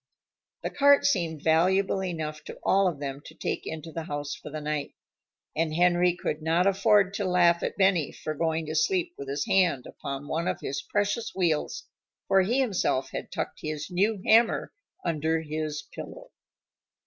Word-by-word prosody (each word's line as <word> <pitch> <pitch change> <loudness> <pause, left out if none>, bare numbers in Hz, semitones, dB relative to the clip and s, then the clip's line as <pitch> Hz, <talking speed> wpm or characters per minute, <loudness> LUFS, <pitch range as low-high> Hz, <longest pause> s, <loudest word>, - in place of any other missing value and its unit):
The - - -2
cart 285 0 +5
seemed 165 - 0
valuable 190 +4 +3
enough 155 -4 -4
to - - -8
all 195 0 +4
of 165 -6 -2
them 140 -1 -5
to - - -12
take - - -3
into 160 0 -6
the 165 0 -5
house 145 -1 -4
for - - -9
the 155 +1 -5
night. 150 -1 -3 0.6
And 155 0 0
Henry 175 0 +3
could 155 -3 -3
not 165 +3 +2
afford 195 0 +4
to 205 - -2
laugh 175 -2 +4
at - - -3
Benny 190 -7 +3
for 155 - -5
going 160 +1 -1
to 155 - -4
sleep 165 +3 +1
with 140 - -8
his 140 +1 -1
hand 180 -9 +2
upon 140 +1 -6
one 165 +3 -1
of - - -1
his 140 - -3
precious 205 +3 -1
wheels, 165 -5 0 0.4
for 195 - +5
he 235 +8 +1
himself 190 - 0
had - - -6
tucked - - -4
his 155 +3 -4
new 200 +4 +1
hammer 225 +1 +4 0.3
under 160 +1 0
his 155 -1 -4
pillow. - - -9
165 Hz, 175 wpm, -27 LUFS, 155-190 Hz, 0.6 s, cart